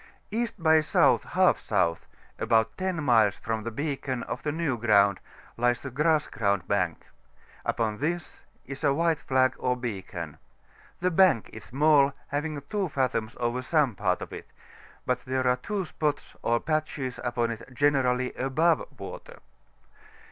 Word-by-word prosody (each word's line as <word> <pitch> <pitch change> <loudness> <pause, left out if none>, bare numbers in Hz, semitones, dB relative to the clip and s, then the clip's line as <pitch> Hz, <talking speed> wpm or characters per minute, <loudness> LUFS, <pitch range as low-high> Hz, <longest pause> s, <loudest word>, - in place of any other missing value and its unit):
E. 235 +2 0
by 160 -3 +4
S. 155 -1 -2
i - - +7
S., - - +1 0.7
about 110 -1 +2
10 185 -4 -2
miles 110 -6 +4
from 115 0 -3
the 115 - -4
beacon 135 -1 -3
of 125 - -5
the 150 - -1
New 155 -4 -1
Ground, 100 -4 +3 0.4
lies 120 0 +1
the 140 - -6
Grass 150 +3 +2
Ground 100 -6 -1
Bank; 90 -5 -1 0.6
upon 110 -2 -1
this 170 +3 -3 0.2
is 140 +2 -8
a 140 -2 +3
white 165 0 +2
flag 130 -1 +2
or 125 0 0
beacon. 95 - -6 0.6
The 180 +1 +2
bank 180 - +4
is 110 - -9
small, 140 0 +4 0.2
having 150 +1 -2
2 200 -1 -1
fathoms 130 -5 -1
over 120 +1 -1
some 140 -2 +2
part 95 -2 0
of - - -9
it; - - -8 0.6
but 125 -1 0
there 130 0 -1
are 125 0 +3
two 195 +8 -3
spots 150 -2 -3
or 120 0 +2
patches 150 -4 -2
upon 120 -1 0
it 115 +2 -8
generally 130 -2 +1
above 155 - +2 0.2
water. - - -9
130 Hz, 155 wpm, -27 LUFS, 115-155 Hz, 0.7 s, i